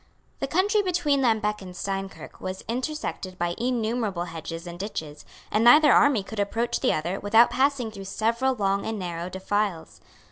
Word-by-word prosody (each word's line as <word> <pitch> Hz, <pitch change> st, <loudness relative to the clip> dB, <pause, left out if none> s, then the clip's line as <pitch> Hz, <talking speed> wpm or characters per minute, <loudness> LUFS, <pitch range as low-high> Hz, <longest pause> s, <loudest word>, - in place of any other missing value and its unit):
The 275 Hz, -, -2 dB
country 400 Hz, +8 st, +2 dB
between 340 Hz, -7 st, +1 dB
Lambeque 215 Hz, -4 st, +1 dB
and 180 Hz, -1 st, -9 dB
Steinkirk 195 Hz, 0 st, -5 dB
was 185 Hz, 0 st, -5 dB
intersected 245 Hz, -7 st, -4 dB
by 175 Hz, -1 st, -1 dB
innumerable 230 Hz, -6 st, -1 dB
hedges 165 Hz, 0 st, -7 dB
and 175 Hz, 0 st, -8 dB
ditches; 160 Hz, -7 st, -6 dB, 0.3 s
and 215 Hz, +2 st, +2 dB
neither 295 Hz, +5 st, +7 dB
army 270 Hz, -8 st, +4 dB
could 220 Hz, +2 st, -7 dB
approach 230 Hz, +4 st, -1 dB
the -, -, +2 dB
other 170 Hz, +5 st, -2 dB
without 225 Hz, +4 st, +5 dB
passing 265 Hz, -4 st, +1 dB
through 200 Hz, -2 st, -9 dB
several 235 Hz, +6 st, 0 dB
long 200 Hz, -2 st, 0 dB
and 220 Hz, 0 st, -3 dB
narrow 175 Hz, -2 st, -4 dB
defiles. 190 Hz, -2 st, -2 dB
210 Hz, 165 wpm, -25 LUFS, 185-250 Hz, 0.3 s, neither